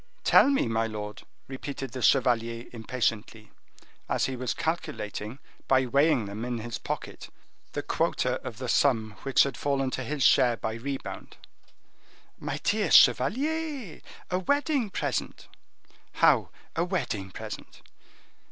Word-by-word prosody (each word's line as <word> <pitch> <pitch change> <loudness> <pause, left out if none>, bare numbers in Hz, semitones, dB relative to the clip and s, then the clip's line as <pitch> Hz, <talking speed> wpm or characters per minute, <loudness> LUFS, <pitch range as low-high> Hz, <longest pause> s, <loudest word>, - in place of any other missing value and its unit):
"Tell - - +6
me, 275 - +2
my 115 0 0
lord," 105 -1 -6 0.3
repeated 135 -1 -6
the 130 - -6
chevalier 115 -2 +2
impatiently, 115 -2 -3 0.6
as - - +1
he 135 - -3
was 125 -1 -2
calculating, 135 - -3 0.3
by 130 -1 +4
weighing 140 -1 +3
them 100 +3 -6
in 120 -1 -2
his 115 0 -5
pocket, - - -6 0.4
the - - -3
quota - - 0
of 110 - -6
the 130 0 -5
sum 115 -3 +2
which 135 -1 +4
had 140 -3 -3
fallen 135 -2 0
to 130 - -3
his 140 +2 -2
share 120 -2 +5
by 110 - -3
rebound. 135 +4 -6 1.0
"My - - -4
dear 205 -3 +1
chevalier, 265 - +3 0.3
a 180 - +1
wedding 285 - +1
present." - - -3 0.7
"How - - +4 0.3
a 165 - +1
wedding 155 - -2
present?" - - -9
130 Hz, 135 wpm, -28 LUFS, 115-160 Hz, 1.0 s, Tell